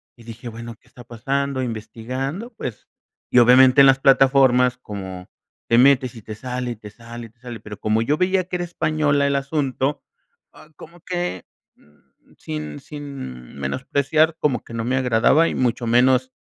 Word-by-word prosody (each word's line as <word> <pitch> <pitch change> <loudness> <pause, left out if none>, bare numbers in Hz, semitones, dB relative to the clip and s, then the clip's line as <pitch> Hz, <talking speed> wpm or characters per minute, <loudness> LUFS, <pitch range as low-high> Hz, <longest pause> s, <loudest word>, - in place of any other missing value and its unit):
Y 120 - -17
dije, 115 +1 -10
bueno, 115 0 -8
¿qué - - -30
está 120 - -14
pasando? 135 +3 -2
Investigando, 130 - -5
pues, 125 - -7 0.4
y 125 - +5
obviamente 130 +3 +7
en 135 - +8
las 135 0 +5
plataformas 130 -2 +4
como, 95 -5 -8 0.4
te 115 - +4
metes 130 -1 +4
y 115 - -10
te 110 +1 -8
sale, 125 +1 -4
y - - -5
te 105 0 -12
sale, 115 +1 -10
y - - -21
te 115 +1 -35
sale, 120 -3 -8
pero 105 -2 -9
como 110 +1 +1
yo 145 +6 0
veía 185 0 +1
que 180 0 -4
era 175 - -3
española 155 -4 0
el 140 0 +1
asunto, 140 0 -2 0.5
ah, 155 - -17
como 170 +4 -14
que, 175 - -4 0.3
mm, 75 0 -29
sin 75 -1 -6
sin 135 - -9
menospreciar, 140 - 0
como 130 -6 0
que 115 - -12
no 115 -1 -3
me 130 +2 0
agradaba 130 +6 +3
y - - -3
mucho 120 -1 -1
menos, 130 +2 +3
125 Hz, 180 wpm, -21 LUFS, 115-140 Hz, 0.5 s, en